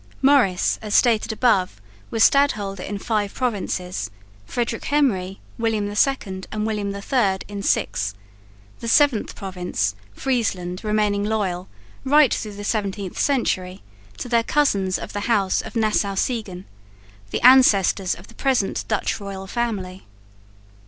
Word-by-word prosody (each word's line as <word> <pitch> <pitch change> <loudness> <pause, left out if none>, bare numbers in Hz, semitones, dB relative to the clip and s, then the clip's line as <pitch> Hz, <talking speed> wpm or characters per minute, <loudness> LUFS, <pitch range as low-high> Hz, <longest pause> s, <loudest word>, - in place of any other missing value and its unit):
Maurice, 260 -10 +3
as 215 -1 -2
stated 230 -2 +3
above, 200 - +1 0.3
was 225 - +2
stadholder 210 -9 +2
in 200 +2 -4
five 205 -1 -2
provinces; 185 - -2 0.4
Frederick 235 -2 -3
Henry, 200 -11 0 0.2
William 220 -3 0
II 205 -3 0
and 215 0 -2
William 210 -2 -2
III 200 0 0
in 205 -1 -6
six; 100 - 0 0.6
the 230 - -6
seventh 270 -2 +3
province, 180 - -2 0.2
Friesland, 195 -8 -2
remaining 210 -1 +1
loyal, 200 -4 -2 0.4
right 290 0 +5
through 210 -2 -4
the 205 - -7
17th 200 -3 -3
century, 185 -9 0 0.3
to - - -5
their 235 -1 +3
cousins 200 -9 +1
of - - -8
the 205 +3 -3
house 200 -5 +2
of - - -10
Nassau 215 -3 +1
Siegen, 195 -4 -2 0.6
the - - -2
ancestors 210 -7 +5
of 175 - -13
the 230 - -17
present 255 -6 0
Dutch 215 +1 -1
royal 195 -1 -7
family. 195 -4 -4
205 Hz, 130 wpm, -22 LUFS, 190-235 Hz, 0.6 s, right